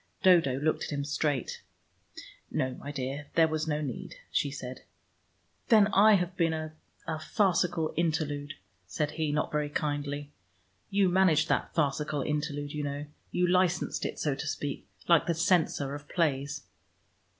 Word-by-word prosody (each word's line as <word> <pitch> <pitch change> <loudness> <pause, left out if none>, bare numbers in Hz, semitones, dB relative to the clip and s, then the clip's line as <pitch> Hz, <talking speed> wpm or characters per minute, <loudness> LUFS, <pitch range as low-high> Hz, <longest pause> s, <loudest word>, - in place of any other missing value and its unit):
Dodo 165 -8 +5
looked 155 +2 0
at - - -7
him 140 -1 -2
straight. 145 -3 -1 0.9
"No, 130 0 -1
my 140 +3 -7
dear, 140 +1 -4
there 165 -1 +6
was 155 0 -2
no 150 -1 0
need," 135 -5 -5 0.2
she 145 - +1
said. 130 -2 -7 0.9
"Then 215 -3 +6
I 215 +2 +7
have 180 -1 -1
been 165 -2 +2
a 155 0 -4 0.3
a 160 -1 -3
farcical 175 -3 +1
interlude," 150 -3 -1 0.3
said 150 +9 -1
he, 155 -2 -1
not 150 +1 0
very 150 -1 0
kindly. 145 -1 -3 0.6
"You 200 -1 +3
managed 175 -4 +3
that - - 0
farcical 150 -1 0
interlude, 145 0 -2
you 150 - -2
know. 145 +1 -3 0.2
You 180 - +1
licensed 180 -1 +1
it, - - -3
so 150 - 0
to 140 +4 -5
speak, 145 -2 -4 0.2
like 170 -2 +5
the 170 - +1
censor 160 -5 +2
of 145 0 -8
plays." 140 -3 0
150 Hz, 155 wpm, -29 LUFS, 145-170 Hz, 0.9 s, I